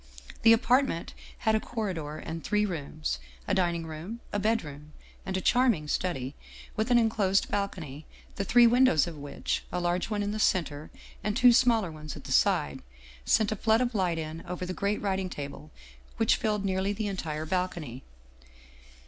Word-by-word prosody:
" - - -16
The 225 - +7
apartment 235 -4 +2 0.3
had 220 - +4
a 220 - +3
corridor 180 -11 -4
and 165 0 -6
three 210 0 +1
rooms; 155 - -3 0.3
a - - +1
din 175 -2 +2
ing 165 -1 -4
room, 160 +9 -7
a 205 - +1
bedroom, 155 -9 -2 0.3
and 190 0 -1
a - - -2
charming 235 -12 +3
study 145 -6 -2 0.4
with 220 +3 -1
an 245 - +5
in 230 -1 +4
closed 195 -3 +1
balcony, 160 -8 -3 0.3
the 200 - -1
three 240 +4 +6
windows 240 - +5
of 170 -2 -7
which, 145 -1 -3
a 180 - -1
large 175 +2 0
one 210 -2 -1
in 205 - -2
the 215 - -3
center 155 -7 0 0.3
and 210 +2 -1
two 245 -1 +7
smaller 230 -7 +3
ones 155 -1 -8
at - - -10
the - - -8
side, 70 - +2 0.4
sent 220 -1 +3
a - - 0
flood 220 +2 +3
of 245 -1 0
light 180 -5 +1
in 160 0 -5
over 180 +1 -4
the 185 - -4
great 200 +2 -1
writing 190 -2 -1
table 145 0 -7 0.5
which 225 -1 +4
filled 210 -2 -1
nearly 190 +1 0
the 215 +1 -3
entire 160 -6 -3
balcony. 170 -7 -3
190 Hz, 185 wpm, -28 LUFS, 160-220 Hz, 0.5 s, The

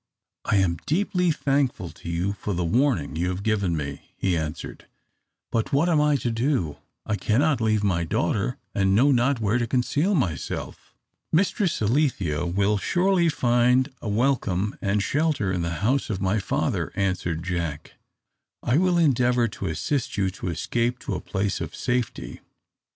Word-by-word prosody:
"I - - +1
am 90 -4 +2
deeply 180 +1 +1
thankful 140 - 0
to - - -10
you 85 +4 -1
for 105 -1 -4
the 90 0 -1
warning 95 - +1
you 85 +3 0
have 90 +2 -4
given 100 -6 +1
me," 70 -2 -7
he 95 -2 +1
answered. 80 0 -5 0.6
"But 115 -1 -1
what 145 +5 +3
am 155 -3 +3
I 150 -1 +3
to 125 -3 -1
do? 115 - 0 0.3
I 110 - 0
cannot 130 +6 +1
leave 110 -2 +2
my 90 -4 +1
daughter, 100 +9 -1 0.2
and 95 -1 +2
know 135 +7 +5
not 130 +1 +2
where 110 +2 +1
to 120 - -1
conceal 145 - +1
myself." 95 - -3 0.4
"Mistress 185 - +1
Alethea 105 - +1
will 100 +4 +1
surely 180 - +2
find 125 0 +2
a 110 - -4
welcome 105 -4 0
and 100 +1 +1
shelter 145 - 0
in 90 - -1
the 85 - -1 0.2
house 135 +4 +1
of 100 -4 -2
my 100 +2 +1
father," 95 - -1
answered 90 -4 -1
Jack. 85 -5 -3 0.7
"I 125 +6 +3
will 180 -1 +3
endeavour 125 -6 +3
to - - -5
assist 85 - -2
you 95 -2 +1
to 95 - -7
escape 115 +8 -1
to - - -4
a - - -3
place 100 -2 -2
of 80 0 -5
safety. 125 -2 -2
110 Hz, 165 wpm, -25 LUFS, 90-140 Hz, 0.7 s, know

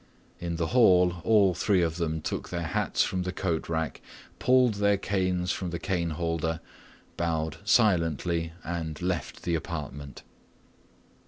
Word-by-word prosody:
In 85 -1 -3
the 85 0 -1
hall 90 -7 +5
all 105 -4 +4
three 95 -1 +2
of 80 0 -1
them 80 -2 -1
took - - -4
their 85 -1 -3
hats 80 - +1
from 95 - -1
the 90 0 -2
coat 85 -4 -2
rack, 80 -1 -2 0.4
pulled 125 -2 +4
their 100 0 +4
canes 90 -2 0
from 95 -2 -3
the 85 - -3
cane 85 -1 -1
holder, 80 0 -2 0.6
bowed 80 -3 -1
silently, 85 - +2
and 80 -2 -4
left 90 -1 -3
the 85 - -1
apartment. 75 -3 -5
85 Hz, 145 wpm, -28 LUFS, 80-95 Hz, 0.6 s, hall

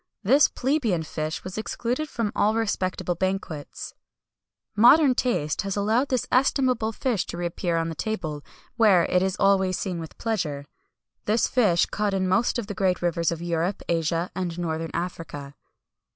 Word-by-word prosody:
This 270 +9 +5
plebeian 245 - 0
fish 155 0 -4
was 185 +3 -5
excluded 245 +7 -3
from 230 -6 -2
all 215 +2 +2
respectable 185 -5 -1
banquets.[Y] 185 -4 -4 0.8
"Modern 255 +6 +6
taste 235 - 0
has 195 -1 -3
allowed 220 +7 +1
this 255 -3 0
estimable 255 -3 +2
fish 230 -3 -1
to - - -6
re 175 - -3
appear 170 0 -1
on 165 0 -1
the - - -4
table, 160 -7 -4 0.3
where 200 -6 +5
it 180 - +2
is 190 0 0
always 190 -2 +3
seen 180 -4 -3
with 160 -1 -9
pleasure. 165 -11 -2 0.6
This 220 +3 +2
fish 205 -9 +3
is - - -2
caught 205 -1 0
in 190 -1 0
most 190 +8 +2
of 240 - -3
the 205 - -5
great 185 -2 0
rivers 170 -1 +1
of 170 0 -5
Europe, 175 +3 -1
Asia, 165 +1 0
and 175 -3 -3
northern 165 -1 -3
Africa." 145 -5 -5
190 Hz, 165 wpm, -25 LUFS, 170-225 Hz, 0.8 s, Modern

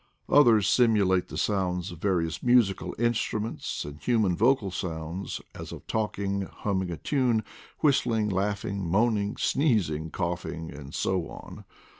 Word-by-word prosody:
Oilier 120 -6 +7
s 95 - 0
simulate 100 -6 +3
the - - -7
sounds 90 -2 -1
of 85 - -10
various 85 -4 0
musical 120 -6 +2
instruments, 115 -1 -1
and 75 0 -8
human 110 -7 +2
vocal 115 -2 +2
sounds, 85 +1 -4
as - - -8
of - - -9
talking, 100 -2 -1
humming 95 -1 -2
a 85 - -4
tune, 125 -6 +1 0.4
whistling, 115 -7 +2
laughing, 100 0 -1
moaning, 105 +3 +1
sneezing, 90 - +1
coughing, 80 +1 -4
and 70 0 -9
so 95 -3 0
on. - - -10
100 Hz, 135 wpm, -27 LUFS, 90-115 Hz, 0.4 s, Oilier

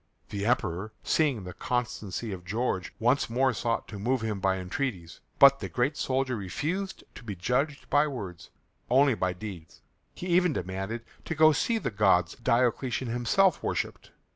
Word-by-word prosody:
The 100 0 -2
Emperor, 110 -4 0
seeing 140 -10 +1
the 90 -1 -7
constancy 115 -2 -3
of 90 -2 -6
George, 100 -1 -2
once 125 +4 +2
more 130 +2 +2
sought 115 +2 -1
to 105 - -7
move 125 +4 0
him 110 -3 -2
by 95 0 +1
entreaties. 90 - -4 0.2
But 140 0 +8
the - - -5
great 125 +5 0
soldier 130 -2 0
refused 155 - -3
to - - -11
be 105 -4 -5
judged 135 - -1
by 145 +1 +3
words, 100 - -7 0.4
only 135 +2 +5
by 95 -4 -1
deeds. 90 -4 -9 0.3
He - - -7
even 180 -2 +3
demanded 95 +4 -4 0.2
to 160 - -3
go 155 0 +6
to - - 0
see 230 - +1
the 215 - -2
gods 95 -4 +3
Diocletian 120 0 +1
himself 120 +11 +2
worshipped. - - -3
120 Hz, 165 wpm, -28 LUFS, 95-135 Hz, 0.4 s, But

